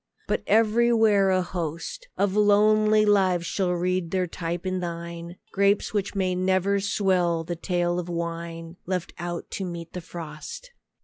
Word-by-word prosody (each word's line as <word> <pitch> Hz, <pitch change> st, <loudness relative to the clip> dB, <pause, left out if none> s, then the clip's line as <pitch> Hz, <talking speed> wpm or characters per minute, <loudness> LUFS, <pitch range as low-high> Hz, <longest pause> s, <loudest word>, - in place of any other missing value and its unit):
But -, -, 0 dB
everywhere 220 Hz, -2 st, +4 dB
a 185 Hz, -1 st, +2 dB
host 175 Hz, -, -5 dB
Of 200 Hz, -1 st, +1 dB
lonely 215 Hz, +1 st, +4 dB
lives 190 Hz, -4 st, +3 dB
shall 180 Hz, 0 st, 0 dB
read 180 Hz, 0 st, -1 dB
their 185 Hz, 0 st, 0 dB
type 170 Hz, +1 st, -4 dB
in 185 Hz, 0 st, -1 dB
thine: 170 Hz, 0 st, -6 dB, 0.2 s
Grapes 200 Hz, +2 st, +2 dB
which 205 Hz, -1 st, -1 dB
may 185 Hz, -2 st, +1 dB
never 190 Hz, +2 st, +1 dB
swell 185 Hz, -4 st, +1 dB
the 175 Hz, +1 st, -4 dB
tale 175 Hz, 0 st, -1 dB
of 175 Hz, 0 st, -5 dB
wine, 170 Hz, 0 st, -5 dB
Left 180 Hz, -2 st, -2 dB
out 175 Hz, 0 st, -5 dB
to 195 Hz, -, -3 dB
meet 170 Hz, -2 st, -6 dB
the 180 Hz, -, -5 dB
frost. 165 Hz, -, -8 dB
185 Hz, 150 wpm, -25 LUFS, 170-200 Hz, 0.2 s, everywhere